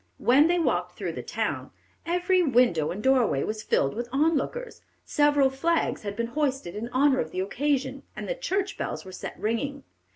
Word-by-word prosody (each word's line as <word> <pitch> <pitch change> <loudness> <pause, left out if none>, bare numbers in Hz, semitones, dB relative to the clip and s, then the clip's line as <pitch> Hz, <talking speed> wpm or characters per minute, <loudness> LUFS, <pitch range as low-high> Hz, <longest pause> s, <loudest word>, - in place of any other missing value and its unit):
When 275 +6 +5
they 350 +1 +2
walked 335 - 0
through - - -3
the - - -5
town, - - -3 0.4
"every 360 +2 +2
window 245 - +3
and 205 +4 -5
doorway 255 - +3
was 215 0 -3
filled 140 -9 +1
with 240 +1 -4
on 310 +5 +3
lookers, 480 - -4 0.2
several 290 -2 +3
flags 330 +5 0
had 205 -1 -5
been 235 +2 -1
hoisted 270 - -1
in 225 +3 -4
honor 265 +2 +3
of 160 - -1
the 185 - -3
occasion, 275 +7 -1
and - - -6
the - - 0
church 400 -6 -2
bells - - -4
were 190 - -9
set 185 - -7
ringing. 275 +6 -2
270 Hz, 190 wpm, -26 LUFS, 220-320 Hz, 0.4 s, When